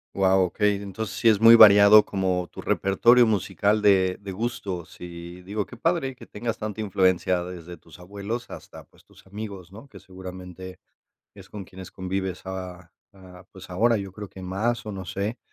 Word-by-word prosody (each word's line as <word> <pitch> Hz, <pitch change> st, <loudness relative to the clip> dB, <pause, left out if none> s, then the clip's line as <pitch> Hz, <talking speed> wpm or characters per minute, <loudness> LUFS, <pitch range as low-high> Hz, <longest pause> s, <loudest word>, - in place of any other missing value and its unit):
Guau, 95 Hz, -1 st, +3 dB
okey, 105 Hz, +3 st, 0 dB
entonces 100 Hz, +1 st, -6 dB
sí 120 Hz, -, 0 dB
es 110 Hz, -2 st, +4 dB
muy 115 Hz, +1 st, +9 dB
variado 105 Hz, 0 st, +8 dB
como 95 Hz, -2 st, -2 dB
tu -, -, -10 dB
repertorio 120 Hz, +5 st, +3 dB
musical 105 Hz, 0 st, 0 dB
de 95 Hz, -3 st, +3 dB
de 100 Hz, -1 st, -7 dB
gustos 95 Hz, -4 st, -5 dB
y 85 Hz, 0 st, -9 dB
digo 100 Hz, +3 st, -4 dB
qué -, -, -13 dB
padre, 135 Hz, -1 st, -1 dB
que -, -, -13 dB
tengas 115 Hz, +1 st, -5 dB
tanta 110 Hz, 0 st, -6 dB
influencia 95 Hz, -3 st, +1 dB
desde 90 Hz, -1 st, -9 dB
tus 80 Hz, -1 st, -18 dB
abuelos 100 Hz, +6 st, -6 dB
hasta, -, -, -11 dB
pues, -, -, -25 dB
tus -, -, -21 dB
amigos, 100 Hz, -3 st, -9 dB
¿no? 115 Hz, +7 st, -13 dB
Que -, -, -13 dB
seguramente 95 Hz, 0 st, -10 dB, 0.5 s
es -, -, -15 dB
con 105 Hz, -2 st, -8 dB
quienes 95 Hz, 0 st, -12 dB
convives 95 Hz, -1 st, -4 dB
a 90 Hz, -2 st, -8 dB, 0.2 s
a 95 Hz, -2 st, -15 dB
pues, 95 Hz, -1 st, -13 dB
ahora, 115 Hz, +6 st, +2 dB
yo 100 Hz, -2 st, -6 dB
creo 105 Hz, +1 st, -9 dB
que 95 Hz, -, -11 dB
más 110 Hz, +6 st, -2 dB
o 105 Hz, -, -5 dB
no 95 Hz, -2 st, -6 dB
sé, 100 Hz, +6 st, -4 dB
95 Hz, 180 wpm, -24 LUFS, 90-105 Hz, 0.5 s, muy